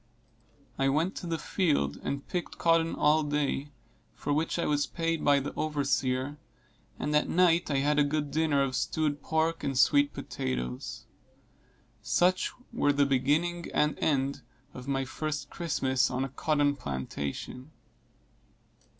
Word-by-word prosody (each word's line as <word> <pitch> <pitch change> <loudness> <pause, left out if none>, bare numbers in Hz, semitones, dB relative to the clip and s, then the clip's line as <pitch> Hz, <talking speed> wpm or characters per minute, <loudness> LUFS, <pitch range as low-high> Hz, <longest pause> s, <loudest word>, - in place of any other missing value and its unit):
I 135 0 +3
went 160 +7 +1
to 175 - -5
the 165 -1 -1
field 150 - 0
and 140 0 -4
picked 175 -1 -4
cotton 165 -1 +2
all 150 +1 +4
day, 145 -1 -1 0.4
for 145 - -2
which 155 +4 0
I 170 - 0
was 145 -2 +1
paid 165 +3 -2
by 145 -1 +5
the 140 - -5
overseer, 140 -2 -1 0.6
and 150 +2 -1
at 150 - +2
night 175 -1 +3
I 140 - +1
had 150 0 +3
a - - +6
good 145 0 -1
dinner 150 -2 +2
of 130 -2 -2
stewed 145 +1 -1
pork 160 +2 0
and 135 -2 -1
sweet 145 +2 +4
potatoes. 60 -1 -4 1.0
Such 185 +1 +2 0.2
were 145 -10 +3
the 140 0 +3
beginning 150 +6 +1
and 150 0 +2
end 140 -2 0 0.3
of 125 +1 -9
my 135 -1 0
first 155 +2 -4
Christmas 135 -6 0
on 130 +1 -1
a - - -6
cotton 145 +1 +1
plantation. 70 - -5
145 Hz, 145 wpm, -29 LUFS, 135-160 Hz, 1.0 s, a